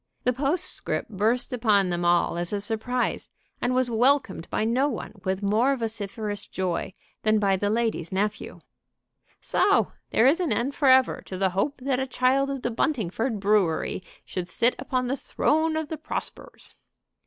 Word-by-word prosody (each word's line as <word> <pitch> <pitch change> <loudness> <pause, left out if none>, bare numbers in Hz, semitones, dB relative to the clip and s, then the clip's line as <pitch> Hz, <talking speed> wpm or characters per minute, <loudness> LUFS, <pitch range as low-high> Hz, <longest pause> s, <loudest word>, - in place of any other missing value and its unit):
The 250 - +2
postscript 290 -1 -1
burst 220 +6 +1
upon 210 -6 +3
them 175 0 -1
all 175 0 +2
as 175 0 -2
a 205 - -1
surprise, 225 +4 -2 0.3
and 250 +1 +1
was 255 -1 +1
welcomed 240 - +2
by - - 0
no 250 +6 +2
one 235 - -6
with 190 +1 -2
more 225 +7 +3
vociferous 210 -3 -5
joy 185 -1 -3 0.3
than 215 0 +3
by 200 -2 +2
the 205 +2 -1
lady's 220 -7 -1
nephew. 205 +2 -2 0.8
"So - - +2 0.2
there 225 - +3
is 290 +7 +5
an 355 -4 0
end 260 +4 0
forever 260 -2 +4
to 185 - -5
the 190 0 +1
hope 200 +10 -1
that 260 -1 0
a 265 - -1
child 265 +2 +2
of 275 -2 -4
the 240 - -1
Buntingford 225 - -1
Brewery 195 -5 +1 0.2
should 180 -1 -5
sit 235 +6 +2
upon 260 -1 -1
the 255 +2 -1
throne 315 +3 0
of 315 -2 -3
the 315 - -4
Prospers." 310 - -6
230 Hz, 165 wpm, -26 LUFS, 200-265 Hz, 0.8 s, is